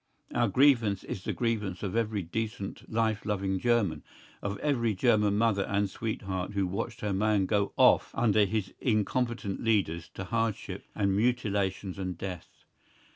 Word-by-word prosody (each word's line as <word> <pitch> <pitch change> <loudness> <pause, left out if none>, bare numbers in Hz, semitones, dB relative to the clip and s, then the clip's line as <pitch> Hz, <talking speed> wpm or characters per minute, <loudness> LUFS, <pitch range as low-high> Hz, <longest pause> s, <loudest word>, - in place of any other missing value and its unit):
Our 120 -1 +2
grievance 115 -4 +3
is 95 - -6
the - - -2
grievance 105 -6 -2
of 95 -1 -3
every 110 -3 0
decent 105 +3 -5
life 110 -1 +1
loving 95 -2 -1
German, 105 -11 +1 0.4
of 100 0 -3
every 115 -4 0
German 105 -1 +3
mother 110 -3 +2
and 100 0 +1
sweetheart 100 -4 -3
who 100 -1 +1
watched 100 +4 -4
her 105 -2 -1
man 105 0 +2
go 100 0 +1
off - - +5
under 110 -3 +4
his 100 -1 -2
incompetent 115 -2 0
leaders 95 -8 +1
to - - -4
hardship 115 +2 -2
and 100 -1 +1
mutilations 100 -4 0
and 95 -3 -3
death. 90 -2 -7
105 Hz, 150 wpm, -29 LUFS, 95-115 Hz, 0.4 s, off